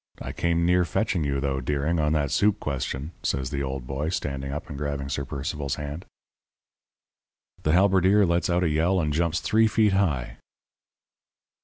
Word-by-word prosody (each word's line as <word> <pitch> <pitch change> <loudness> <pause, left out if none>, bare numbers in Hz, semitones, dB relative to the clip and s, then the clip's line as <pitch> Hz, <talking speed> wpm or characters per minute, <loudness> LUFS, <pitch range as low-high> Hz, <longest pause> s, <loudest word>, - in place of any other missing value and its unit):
I - - -5
came 85 0 0
near 90 +1 +4
fetching 90 0 0
you, 70 -1 -1
though, 70 -1 -1
Deering, 75 +5 0
on 75 0 +2
that 70 -3 0
soup 105 +7 +2
question,' 70 +1 -3
says 65 -2 -2
the 70 - -2
old 65 -2 -4
boy, 70 +4 -3
standing 70 -5 -3
up 75 +4 -5
and 75 - -7
grabbing 70 -1 -3
Sir 70 0 -2
Percival's 70 0 -3
hand. 75 +3 -6 1.6
"The 75 - +1
halberdier 95 +2 +4
lets 85 -1 +1
out 90 +1 +2
a - - +2
yell 85 +5 +2
and 75 -3 0
jumps 85 +1 +1
three 110 +1 +3
feet 105 -2 +3
high. 70 -11 0
75 Hz, 170 wpm, -25 LUFS, 70-90 Hz, 1.6 s, near